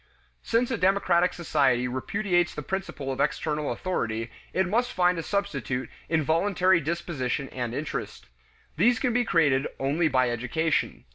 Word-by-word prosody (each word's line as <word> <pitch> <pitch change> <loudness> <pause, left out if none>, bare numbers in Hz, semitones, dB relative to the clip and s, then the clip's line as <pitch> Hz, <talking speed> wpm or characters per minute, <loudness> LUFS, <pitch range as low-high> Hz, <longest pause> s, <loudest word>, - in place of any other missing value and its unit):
Since 235 +2 +1
a 230 - -1
democratic 185 -2 +3
society 135 -7 +1
repudiates 175 +7 0
the 150 - -5
principle 190 -6 -4
of 130 - -5
external 150 -2 -1
authority, 115 -11 -2 0.2
it 190 - +1
must 240 +6 0
find 180 -1 +2
a - - -1
substitute 140 - -2 0.2
in 160 -2 +2
voluntary 180 +3 +3
disposition 150 -4 -2
and 120 -2 -4
interest; 150 +2 -5 0.5
these 240 0 +4
can 245 0 0
be 245 0 +3
created 150 - +2
only 145 +5 +1
by 130 -4 +2
education. 130 +7 -1
160 Hz, 145 wpm, -26 LUFS, 135-190 Hz, 0.5 s, these